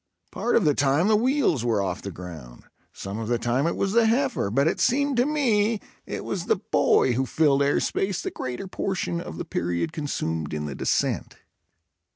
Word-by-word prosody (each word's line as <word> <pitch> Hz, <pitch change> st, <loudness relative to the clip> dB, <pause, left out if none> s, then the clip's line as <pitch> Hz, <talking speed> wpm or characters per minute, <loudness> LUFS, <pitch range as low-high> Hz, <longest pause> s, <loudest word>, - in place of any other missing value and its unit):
Part 240 Hz, -, 0 dB
of 205 Hz, -, +3 dB
the 150 Hz, -, +4 dB
time 145 Hz, +7 st, +2 dB
the 215 Hz, -, +5 dB
wheels 235 Hz, -, +2 dB
were 115 Hz, -3 st, +1 dB
off 95 Hz, -1 st, -2 dB
the 100 Hz, -, -5 dB
ground, 80 Hz, -9 st, -10 dB, 0.3 s
some 100 Hz, +3 st, -6 dB
of 110 Hz, -, -4 dB
the 120 Hz, +1 st, +1 dB
time 120 Hz, +6 st, 0 dB
it 170 Hz, -, -1 dB
was 195 Hz, -, 0 dB
the 230 Hz, +1 st, +4 dB
heifer, 245 Hz, -, +1 dB
but 135 Hz, +8 st, +2 dB
it 165 Hz, -, 0 dB
seemed 280 Hz, +2 st, +2 dB
to 245 Hz, +3 st, +3 dB
me 230 Hz, -8 st, +2 dB, 0.3 s
it -, -, -5 dB
was -, -, -3 dB
the -, -, +4 dB
boy 130 Hz, -, +2 dB
who 130 Hz, +2 st, 0 dB
filled 145 Hz, -2 st, +3 dB
air 140 Hz, +1 st, +3 dB
space 195 Hz, -2 st, -1 dB
the -, -, -3 dB
greater 130 Hz, +10 st, -5 dB
portion 180 Hz, -2 st, -2 dB
of 80 Hz, -, -8 dB
the -, -, -4 dB
period 85 Hz, -1 st, -2 dB
consumed 80 Hz, -, -3 dB
in 75 Hz, 0 st, -3 dB
the 75 Hz, -, -4 dB
descent. -, -, -1 dB
140 Hz, 200 wpm, -25 LUFS, -, 0.3 s, the